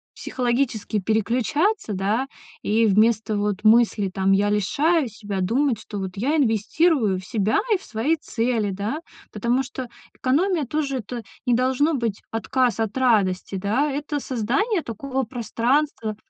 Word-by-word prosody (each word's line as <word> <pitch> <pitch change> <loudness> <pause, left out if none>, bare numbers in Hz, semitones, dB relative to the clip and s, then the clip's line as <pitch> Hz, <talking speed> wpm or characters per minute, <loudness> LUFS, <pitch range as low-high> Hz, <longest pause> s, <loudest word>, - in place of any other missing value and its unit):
психологически 240 -4 -1
переключаться, 235 - 0
да, 205 +7 0 0.3
и 225 +2 +2
вместо 215 +1 +3
вот 205 -1 -1
мысли, 220 -2 +4
там: 190 0 +1
"Я 205 +1 +3
лишаю 290 - +2
себя", 205 -3 -5
думать, 240 +4 +1
что 210 -1 -8
"вот 190 -1 -4
я 275 +10 +1
инвестирую 225 - +2
в 185 - -11
себя 215 -2 +1 0.2
и - - +3
в - - -16
свои 240 +9 0
цели", 230 -6 -1
да, 205 +10 -3 0.3
потому 235 +5 +1
что 255 0 -6 0.3
экономия 315 +4 +1
тоже, 275 0 -2
это 235 +1 -6 0.2
не 245 - +4
должно 265 +5 +2
быть 230 -6 -2
отказ 240 +2 0
от 220 -1 -1
радости, 200 -7 +2
да, 215 +10 0
это 290 +1 -3
создание 275 - 0
такого 265 +4 -3
пространства 235 0 -1
235 Hz, 145 wpm, -23 LUFS, 210-275 Hz, 0.3 s, мысли